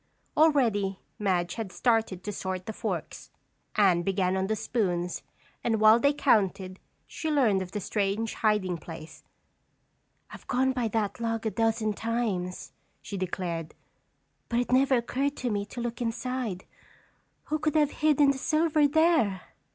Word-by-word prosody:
Already 230 -11 +3 0.2
Madge 180 -4 0
had 220 -3 -5
started 225 -7 +1
to 210 - -3
sort 185 -2 -4
the 220 - -5
forks. - - -5 0.5
Anne 190 -5 +4
began 190 0 0
on 190 0 0
the 220 - 0
spoons 180 -6 -1 0.4
and 225 -2 +1
while 215 +2 +7
they 280 +3 +4
counted, 195 -9 +1 0.3
she 320 - -4
learned 240 -10 +3
of 185 0 -6
the 210 - -3
strange 205 +3 -1
hiding 205 -5 0
place. 160 0 -10 1.1
"I've - - -12
gone 260 +1 +2
by 250 -3 -1
that 215 0 -2
log 230 -1 -2
a 220 - 0
dozen 225 -1 0
times," 210 -5 -2 0.3
she 205 - -7
declared, 175 -3 -4 0.7
"but 235 - +1
it 245 - -2
never 265 +1 +4
occurred 270 +4 -1
to 245 -2 -2
me 205 -1 -2
to 240 - -7
look 240 +1 -4
inside. 235 -4 -3 0.8
Who 310 +1 -2
could 305 0 -1
have 295 -2 +3
hidden 295 -2 +3
the 270 - -4
silver 310 0 +2
there?" 305 - +3
220 Hz, 150 wpm, -28 LUFS, 190-255 Hz, 1.1 s, while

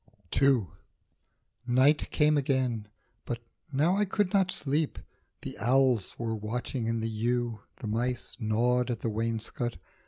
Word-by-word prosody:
II. 135 -6 +5 1.0
NIGHT 130 +5 +4
came 150 0 +3
again, 130 -6 0 0.4
but 120 - -3 0.3
now 155 +7 +3
I 210 - +3
could 205 -1 0
not 190 -2 +3
sleep; 150 +2 0 0.5
The - - -5
owls 125 -2 +2
were 115 -1 -2
watching 115 +2 -3
in 115 0 0
the 110 - -1
yew, 115 +1 -1 0.2
the 115 - -7
mice 120 +3 -1
Gnawed 120 +3 +2
at 120 -3 -2
the 115 - -1
wainscot. 115 +2 -2
125 Hz, 135 wpm, -29 LUFS, 115-135 Hz, 1.0 s, II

